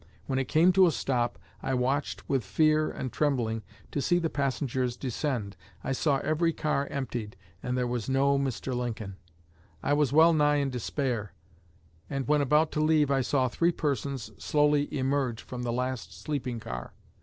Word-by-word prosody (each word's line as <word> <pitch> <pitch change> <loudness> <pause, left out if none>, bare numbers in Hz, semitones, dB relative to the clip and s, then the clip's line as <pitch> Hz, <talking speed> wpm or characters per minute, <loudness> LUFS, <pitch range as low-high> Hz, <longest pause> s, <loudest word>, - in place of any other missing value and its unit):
When 135 -1 -1
it 130 - -1
came 170 +4 +4
to 190 0 +6
a - - +3
stop 120 -5 -1 0.2
I 135 - -1
watched 130 +4 -1
with 135 -4 +1
fear 155 +9 +2
and 130 - -5
trembling 120 -7 0 0.3
to 145 - -1
see 175 +4 +3
the 165 -2 -1
passengers 130 -3 -1
descend. 125 -5 -2 0.3
I - - -2
saw 140 +1 +2
every 165 +2 +1
car 150 -3 0
emptied, 120 -7 -4 0.2
and 125 0 -2
there 125 - +1
was 120 -2 -2
no 140 +1 +3
Mr. 135 -1 -2
Lincoln. 115 -5 -4 0.7
I 145 - +2
was 145 -3 +2
well 160 +3 +6
nigh 150 -1 +3
in 140 -2 0
despair, 125 -4 -2 0.8
and 135 -1 -3
when 150 0 +3
about 150 +3 +3
to - - -2
leave 155 -2 +3
I 135 -1 +3
saw 130 0 +1
three 170 +8 +2
persons 140 -5 -2
slowly 145 -1 +2
emerge 135 -3 -1
from 125 -1 -6
the 120 -1 -1
last 125 -7 -3
sleeping 125 -1 -3
car. 60 - -6
135 Hz, 175 wpm, -28 LUFS, 125-150 Hz, 0.8 s, to